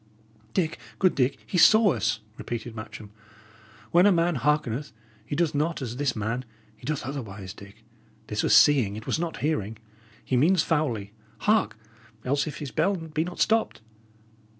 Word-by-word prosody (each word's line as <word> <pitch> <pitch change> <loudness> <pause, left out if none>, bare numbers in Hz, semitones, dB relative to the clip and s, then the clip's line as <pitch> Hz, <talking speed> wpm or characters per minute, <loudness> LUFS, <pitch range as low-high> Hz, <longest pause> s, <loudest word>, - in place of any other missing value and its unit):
'" 110 0 -31
"Dick, 165 -4 0 0.2
good 185 -2 +3
Dick, 135 +1 +1
he 180 - -1
saw 215 +1 +6
us," 110 -1 -1
repeated 120 0 -6
Matcham. 110 -1 -9 0.8
"When 175 +3 +6
a - - +6
man 170 -1 +2
hearkeneth, 145 0 0 0.3
he 115 - -5
doth 170 -1 +1
not 155 +3 0
as 125 -3 -5
this 140 -2 0
man; 115 +4 -2 0.3
he 110 - -12
doth 150 -3 -2
otherwise, 105 -8 -6
Dick. 100 +2 -14 0.4
This 105 -1 -2
was - - +4
seeing; 125 -9 +5
it 110 - -8
was - - -1
not 170 -1 -4
hearing. 110 -9 -1 0.5
He 130 - 0
means 170 +7 +4
foully. 115 -11 -1 0.3
Hark, 215 - +2 0.5
else, 140 +4 +1
if 150 - -5
his 145 -3 -6
bell 185 +6 +1
be 160 -2 -3
not 175 +1 -7
stopped!" 225 - +1
140 Hz, 170 wpm, -26 LUFS, 110-165 Hz, 0.8 s, saw